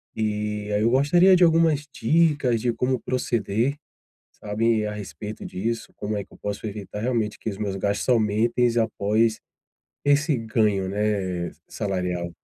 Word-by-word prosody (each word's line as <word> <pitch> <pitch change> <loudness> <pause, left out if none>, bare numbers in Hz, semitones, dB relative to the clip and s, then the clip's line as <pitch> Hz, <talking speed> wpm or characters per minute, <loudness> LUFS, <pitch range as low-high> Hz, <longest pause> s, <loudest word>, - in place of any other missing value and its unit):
E 105 -1 -2
aí, 105 - +1
eu 115 - +3
gostaria 175 +9 +5
de 180 - +4
algumas 160 -3 +3
dicas 145 -3 +2
de 120 +1 0
como 125 +1 0
proceder, 120 +1 -1 0.6
sabe, 110 +1 0
a 105 - -2
respeito 105 +1 -7
disso, 115 +4 -3
como 105 +1 -3
é 100 - -3
que - - -28
eu - - -14
posso 105 +1 -4
evitar 105 -1 -6
realmente 115 -3 -1
que - - -5
os 100 -3 -4
meus 100 -2 -2
gastos 100 +4 -1
aumentem 115 +1 +2
após 110 0 +1 0.6
esse 145 +1 +3
ganho, 110 -4 0
né? 95 -4 -1 0.2
Salarial. 90 -3 -3
110 Hz, 150 wpm, -24 LUFS, 105-125 Hz, 0.6 s, gostaria